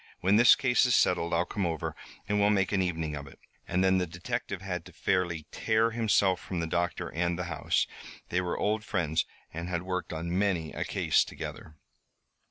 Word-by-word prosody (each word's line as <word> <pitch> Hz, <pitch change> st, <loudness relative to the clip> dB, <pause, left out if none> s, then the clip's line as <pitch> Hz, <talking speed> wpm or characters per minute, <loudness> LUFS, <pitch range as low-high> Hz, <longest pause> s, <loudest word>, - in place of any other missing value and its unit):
When 95 Hz, +3 st, +4 dB
this 120 Hz, +2 st, +8 dB
case 130 Hz, -3 st, +3 dB
is 125 Hz, -, +4 dB
settled, 85 Hz, -1 st, +2 dB
I'll 85 Hz, +1 st, +2 dB
come 95 Hz, 0 st, -2 dB
over 80 Hz, -3 st, -3 dB, 0.3 s
and 105 Hz, 0 st, +1 dB
we'll 100 Hz, 0 st, +4 dB
make 95 Hz, -3 st, +2 dB
an 100 Hz, -2 st, +2 dB
evening 80 Hz, -4 st, -2 dB
of 70 Hz, -1 st, -7 dB
it." 70 Hz, -, -14 dB, 0.3 s
And 90 Hz, +1 st, +1 dB
then 95 Hz, 0 st, +4 dB
the 90 Hz, -, -1 dB
detective 90 Hz, +3 st, -4 dB
had 90 Hz, -3 st, -4 dB
to -, -, -12 dB
fairly 85 Hz, -4 st, -1 dB
tear 110 Hz, +1 st, +2 dB
himself 105 Hz, -5 st, +2 dB
from 90 Hz, -1 st, -4 dB
the 85 Hz, -, -1 dB
doctor 85 Hz, +1 st, -1 dB
and 85 Hz, +1 st, -1 dB
the 90 Hz, -, -2 dB
house. -, -, +1 dB, 0.4 s
They 90 Hz, -, +1 dB
were 90 Hz, -1 st, -2 dB
old 105 Hz, +1 st, 0 dB
friends 85 Hz, -7 st, 0 dB, 0.3 s
and 85 Hz, +2 st, -5 dB
had 85 Hz, -1 st, -2 dB
worked 90 Hz, -1 st, -3 dB
on 85 Hz, +2 st, -3 dB
many 90 Hz, -5 st, 0 dB
a -, -, -3 dB
case -, -, +2 dB
together. 80 Hz, -, -8 dB
90 Hz, 200 wpm, -29 LUFS, 85-100 Hz, 0.4 s, this